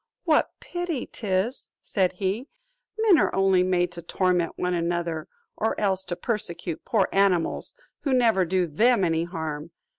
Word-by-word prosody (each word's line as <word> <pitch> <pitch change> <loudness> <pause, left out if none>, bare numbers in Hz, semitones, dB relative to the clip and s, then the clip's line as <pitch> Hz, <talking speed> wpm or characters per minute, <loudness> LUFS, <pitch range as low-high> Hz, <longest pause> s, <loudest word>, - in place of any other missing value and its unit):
"What 315 -3 +3
pity 350 -7 -3
'tis," 205 +4 -2
said 190 -3 +1
he, 195 +8 -2 0.5
"men 430 -7 +5
are - - +2
only 190 -1 +4
made 180 -1 +1
to 175 -1 -8
torment 180 0 0
one 180 0 -1
another, 170 -2 -1 0.3
or 220 - -1
else 190 -2 +1
to 175 -1 -3
persecute 175 -5 -3
poor 205 -5 +2
animals 195 -4 +1 0.2
who 280 - -2
never 230 -7 +4
do 180 +1 +1
them 215 +7 +3
any 165 -1 +1
harm!" 160 -3 -5
185 Hz, 150 wpm, -25 LUFS, 175-220 Hz, 0.5 s, men